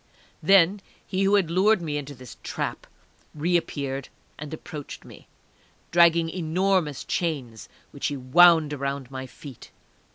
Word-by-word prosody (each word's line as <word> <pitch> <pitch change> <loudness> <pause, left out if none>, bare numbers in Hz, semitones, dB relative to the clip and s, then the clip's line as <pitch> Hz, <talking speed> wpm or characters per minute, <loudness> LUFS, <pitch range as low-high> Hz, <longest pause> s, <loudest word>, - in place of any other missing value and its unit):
Then 195 +3 +4 0.2
he 190 - -2
who 200 +1 +4
had 185 -5 +1
lured 195 +4 +3
me 155 -4 -4
into 145 -1 -5
this 125 -1 -12
trap - - -5 0.5
reappeared 145 -5 -2 0.3
and 150 0 -7
approached 155 -2 -8
me, - - -15 0.6
dragging 170 -1 +5
enormous 175 -2 0
chains, 135 -10 -3 0.2
which 140 - -3
he 145 - -3
wound 160 +3 +5
around 140 -2 -4
my 130 0 -6
feet. 135 -2 -12
155 Hz, 130 wpm, -25 LUFS, 140-175 Hz, 0.6 s, dragging